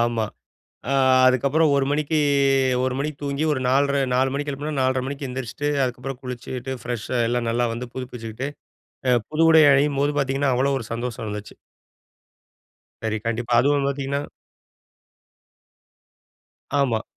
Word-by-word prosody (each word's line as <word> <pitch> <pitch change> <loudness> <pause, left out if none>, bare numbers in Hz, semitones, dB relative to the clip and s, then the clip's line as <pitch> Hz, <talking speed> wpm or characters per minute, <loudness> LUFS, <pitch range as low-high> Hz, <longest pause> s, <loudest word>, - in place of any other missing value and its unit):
ஆமா. 115 -1 +1 0.7
அ, - - +1 0.3
அதுக்கப்புறம் 140 +5 +3
1:00 135 -1 +2
மணிக்கு 150 +1 0 0.7
1:00 130 - -1
மணிக்கு 145 0 -3
தூங்கி, 140 +2 -1
ஒரு 130 - -1
4:30 140 +1 +2
4:00 130 +1 +3
மணிக்கு 145 +1 -2
எழுப்புனா, 145 +2 -4
4:30 130 0 +1
மணிக்கு 140 0 -5
எந்திரிச்சுட்டு. 130 +3 -3
அதுக்கப்புறம் 125 +1 -5
குளிச்சிட்டு 125 +1 -5
ஃப்ரெஷ்ஷா 120 0 -3
எல்லாம் 120 -1 -1
நல்லா 120 +1 +1
வந்து 125 +1 -6
புதுப்பிச்சுக்கிட்டு 125 0 -5 0.6
அ, 125 - +4 0.2
புது 160 +1 +2
உடை 160 0 +7
அணியும் 140 +1 +3
போது 145 +1 +1
பாத்தீங்கன்னா, 135 0 +1
அவ்ளோ 135 +3 +1
ஒரு 115 - -6
சந்தோஷம் 115 -1 -4
இருந்துச்சு. 105 -1 -6 1.5
சரி 110 -1 -1
கண்டிப்பா, 115 +1 -1
அதுவும் 140 +1 +2
பாத்தீங்கன்னா. 140 0 -2 2.6
ஆமா. 115 -5 +1
130 Hz, 135 wpm, -23 LUFS, 120-140 Hz, 2.6 s, உடை